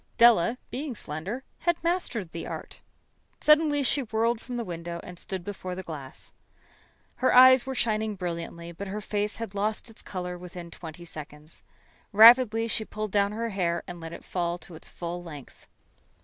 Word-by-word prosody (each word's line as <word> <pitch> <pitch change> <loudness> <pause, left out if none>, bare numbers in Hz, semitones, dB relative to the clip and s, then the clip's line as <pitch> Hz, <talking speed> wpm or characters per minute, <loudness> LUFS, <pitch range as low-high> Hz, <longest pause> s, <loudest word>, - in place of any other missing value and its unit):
Della, 235 -1 +6
being 275 -1 -4
slender, 185 - -5 0.2
had 345 -1 +1
mastered 335 - -1
the 165 - -6
art. - - -7 0.6
Suddenly 300 -1 +4
she 275 +2 +2
whirled 230 0 0
from 245 -2 -5
the 235 - -1
window 170 -2 -5
and 180 -1 -10
stood 190 -2 -5
before 185 -2 -5
the 190 - -6
glass. 145 -6 -9 0.9
Her 260 - +3
eyes 260 0 +8
were 265 - -3
shining 220 -2 0
brilliantly, 170 -2 -5
but 195 +4 -7
her 200 +2 -4
face 210 0 -2
had 225 -3 -6
lost 215 +3 -2
its 220 - -9
color 180 -1 -5
within 175 -1 -9
twenty 165 0 -9
seconds. 155 -1 -9 0.5
Rapidly 225 +1 +8
she 225 - -1
pulled 215 -1 -5
down 200 0 +2
her 230 +1 -2
hair 175 -4 -1
and 175 -1 -8
let 165 0 -7
it - - -10
fall 175 -1 -1
to 170 0 -12
its 160 - -11
full 175 0 -5
length. 150 -6 -11
200 Hz, 175 wpm, -27 LUFS, 170-230 Hz, 0.9 s, eyes